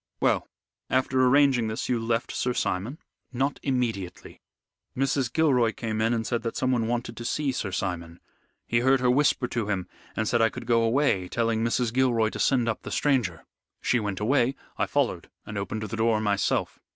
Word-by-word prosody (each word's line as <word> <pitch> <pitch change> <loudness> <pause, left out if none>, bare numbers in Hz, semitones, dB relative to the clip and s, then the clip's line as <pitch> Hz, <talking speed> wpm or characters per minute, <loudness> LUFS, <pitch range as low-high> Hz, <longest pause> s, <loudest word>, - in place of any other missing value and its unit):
"Well, - - +1 0.4
after 130 0 +2
arranging 130 -3 +4
this 110 0 -3
you 125 -2 +1
left 115 +1 -1
Sir 125 -1 -1
Simon?" 105 +11 -2 0.3
"Not 135 +3 -1
immediately. 115 -9 -3 0.6
Mrs. 135 -2 +1
Gilroy 125 -8 +3
came 110 -2 -3
in 115 +1 +2
and 115 -1 0
said 120 0 -1
that 115 0 -4
someone 125 -3 +1
wanted 120 -1 -2
to 120 - -7
see 140 +3 0
Sir 105 -6 -3
Simon. 90 -3 -4 0.5
He 115 - +1
heard 130 +2 +4
her 125 -1 +3
whisper 135 -1 +2
to 115 -4 -2
him, 95 -3 -1 0.3
and 110 - -1
said 120 +1 +2
I 115 - +5
could 115 - -8
go 115 0 +3
away, 115 -5 +2
telling 115 +1 0
Mrs. 115 0 0
Gilroy 120 -4 +2
to - - -7
send 125 -4 +2
up 115 - -1
the - - -7
stranger. 120 - 0 0.3
She 120 - +1
went 105 -3 -3
away. 125 +4 +2 0.2
I - - 0
followed, - - -1 0.2
and 105 - -7
opened 100 +2 -3
the 110 +1 -4
door 110 -1 +2
myself." 100 -4 0
115 Hz, 190 wpm, -26 LUFS, 110-130 Hz, 0.6 s, I